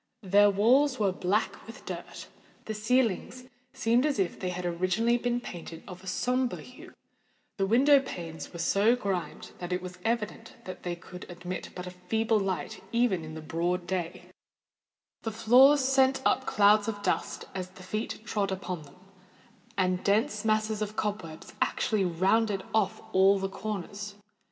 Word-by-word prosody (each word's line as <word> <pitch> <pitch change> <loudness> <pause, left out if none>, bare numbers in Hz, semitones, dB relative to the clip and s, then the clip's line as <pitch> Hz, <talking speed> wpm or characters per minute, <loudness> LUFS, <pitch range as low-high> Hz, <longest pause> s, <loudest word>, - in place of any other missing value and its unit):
Their 205 +2 +5
walls 255 +8 +4
were 205 -3 +2
black 190 +4 -1
with - - -11
dirt—the 220 - -9
ceilings 235 +2 0 0.3
seemed 235 +2 +2
as 295 -1 +1
if 190 -3 -1
they 185 - -2
had 180 0 -4
originally 185 +8 +1
been 240 0 0
painted 170 -7 -8
of 180 -1 -10
a - - -11
sombre 250 +6 0
hue—the 255 - -9
window 275 +6 +6
panes 170 -11 -7
were 170 - -8
so 200 +7 +3
grimed 195 -7 -4
that 175 0 -5
it 180 - +1
was 180 0 -9
evident 225 -1 -2 0.3
they 175 -1 -3
could 180 +1 -11
admit 175 +1 -6
but 180 - -6
a 180 - -6
feeble 220 +5 0
light 190 -1 -3
even 230 -8 +2
in 155 0 -8
the 160 - -6
broad 175 +3 -1
day—the 180 +4 -8
floors 255 +6 +6
sent 265 0 +4
up 260 - +2
clouds 205 +1 +5
of 205 -2 -4
dust - - -1
as 185 -1 -4
the 185 0 -14
feet 215 +4 -4
trod 205 -2 -1
upon 185 -3 -4
them—and 185 +2 -6
dense 210 +1 +1
masses 215 0 +1
of 215 0 -3
cob 210 -1 -1
webs 160 -2 -11
actually 210 -4 +1
rounded 195 +4 +1
off 210 -4 +1
all 195 +1 +5
the 195 0 -1
corners. 200 0 -5
200 Hz, 155 wpm, -29 LUFS, 180-225 Hz, 0.3 s, window